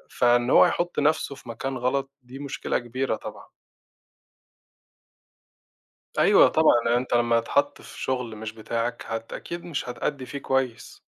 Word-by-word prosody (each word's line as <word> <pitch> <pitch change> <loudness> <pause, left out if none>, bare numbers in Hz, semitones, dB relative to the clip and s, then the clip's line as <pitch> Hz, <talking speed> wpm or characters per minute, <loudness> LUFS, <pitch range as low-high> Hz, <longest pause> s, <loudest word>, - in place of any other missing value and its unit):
فإن 120 0 +3
هو - - +7
يحُطّ 175 -3 -1
نفسُه 145 -1 +1
في 125 - -14
مكان 130 +3 -4
غلط، 135 +2 -1
دي 125 +2 -11
مشكلة 140 -1 -2
كبيرة 120 0 -2
طبعًا. - - -9 2.7
أيوه، - - +7
طبعًا، 120 0 +3
أنت 125 0 -3
لمّا 120 -1 +3
تتحط 140 +5 0
في - - -12
شغل 125 -4 -2
مش 110 0 -6
بتاعَك 115 +2 -3
هت 115 0 -5
أكيد 170 0 -6
مش 150 -7 -4
هتأدّي 130 +2 -3
فيه 140 +3 -6
كويس. 130 -4 -2
125 Hz, 140 wpm, -25 LUFS, 115-135 Hz, 2.7 s, هو